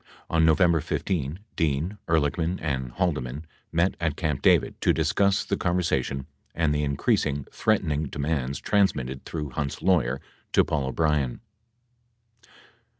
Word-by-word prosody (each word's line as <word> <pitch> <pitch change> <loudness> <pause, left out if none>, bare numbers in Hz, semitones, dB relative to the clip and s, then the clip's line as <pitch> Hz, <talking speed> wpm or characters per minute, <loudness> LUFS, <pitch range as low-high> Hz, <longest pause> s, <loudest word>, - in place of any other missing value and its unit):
On 80 0 +3
November 80 0 +4
15, 80 0 -2
Dean, 80 +4 0
Ehrlichman 80 +2 +1
and 65 -5 -2
Haldeman 75 -5 -2 0.3
met 85 +3 +2
at 80 -4 0
Camp 75 -5 -1
David - - +4
to - - +4
discuss 100 -1 +2
the - - 0
conversation 75 -7 0 0.3
and 75 -2 +2
the 75 - 0
increasing, 70 0 0
threatening 80 -8 +1
demands 70 -2 -2
transmitted 65 -11 0
through 75 -4 -4
Hunt's 70 +1 -4
lawyer 70 -9 +2 0.3
to - - +5
Paul 75 -5 -1
O'Brien. 75 -3 0
75 Hz, 125 wpm, -26 LUFS, 70-85 Hz, 0.3 s, to